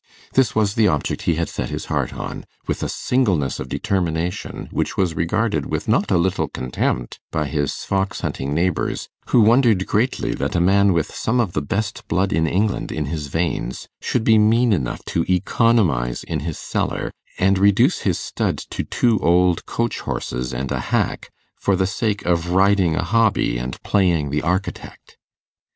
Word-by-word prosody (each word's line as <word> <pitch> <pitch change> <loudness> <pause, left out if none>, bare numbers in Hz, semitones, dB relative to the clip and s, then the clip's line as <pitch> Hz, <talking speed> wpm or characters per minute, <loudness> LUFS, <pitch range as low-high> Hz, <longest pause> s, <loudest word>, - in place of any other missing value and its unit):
This 130 -5 +3
was 105 -2 +2
the 110 -1 +3
object 75 -6 -1
he 85 - +3
had 85 +1 -1
set - - -4
his - - -4
heart - - -1
on, - - -6 0.2
with - - -2
a - - -2
singleness 95 - 0
of - - -6
determination 90 -2 -2
which - - -2
was 90 -4 +1
regarded 85 -1 0
with - - -3
not - - +2
a 95 - +3
little 90 +2 +1
contempt 65 -1 -2
by 75 -1 -1
his 70 0 -1
fox 95 0 -1
hunting 70 +1 -3
neighbours, 85 +3 -1 0.2
who 120 - +4
wondered 110 -3 +4
greatly 120 +5 0
that - - -2
a - - +3
man 100 +3 +4
with 85 -2 -1
some 125 +3 0
of 105 -8 0
the 75 - 0
best 100 +10 -3
blood 95 +3 +1
in 80 +1 +2
England 100 +5 0
in 75 -1 -2
his 75 0 -4
veins, 80 -5 -2
should 120 - 0
be 110 -1 +5
mean 115 +2 +4
enough 70 -10 -2
to 85 - 0
economize 90 - +2
in 80 - -3
his 80 +2 -4
cellar, - - -2 0.3
and 95 +1 +3
reduce 100 - +4
his 95 -4 0
stud - - -2
to - - -5
two 115 -4 +1
old 90 0 +2
coach 115 0 -1
horses 60 +1 -3
and 65 +1 -3
a - - -1
hack, - - 0 0.3
for 100 - +2
the 95 0 +1
sake 105 +2 -2
of 85 0 +1
riding 95 -2 +3
a 95 - 0
hobby, 105 - +2
and 60 +2 -5
playing 85 -8 +2
the 75 +1 0
architect. 90 +4 -4
90 Hz, 180 wpm, -21 LUFS, 80-105 Hz, 0.3 s, be